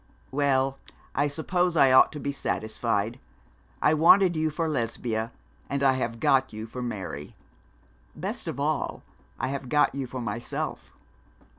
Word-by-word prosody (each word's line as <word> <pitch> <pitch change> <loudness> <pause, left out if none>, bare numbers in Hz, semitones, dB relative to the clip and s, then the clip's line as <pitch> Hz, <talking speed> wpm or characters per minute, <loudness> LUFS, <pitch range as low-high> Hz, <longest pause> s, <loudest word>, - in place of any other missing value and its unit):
'Well, 135 -1 +1 0.3
I 145 +1 +2
suppose 175 +4 0
I 135 -3 +6
ought 130 - +7
to 150 - -6
be 140 - -2
satisfied. 110 -2 -2 0.6
I 150 - +5
wanted 175 +3 +6
you 155 0 +1
for 160 +2 -2
Lesbia, 115 -4 -2 0.4
and 140 0 -1
I 135 -1 +5
have 115 -3 -2
got 135 +2 +3
you 110 +1 -6
for 125 +3 -7
Mary. 95 -11 -5 0.8
Best - - -4
of - - -4
all, - - -1 0.4
I 130 - -1
have 135 -2 -4
got 150 +2 +3
you 135 -1 -3
for 130 +1 -6
myself. 115 0 -4
135 Hz, 150 wpm, -27 LUFS, 115-145 Hz, 0.8 s, ought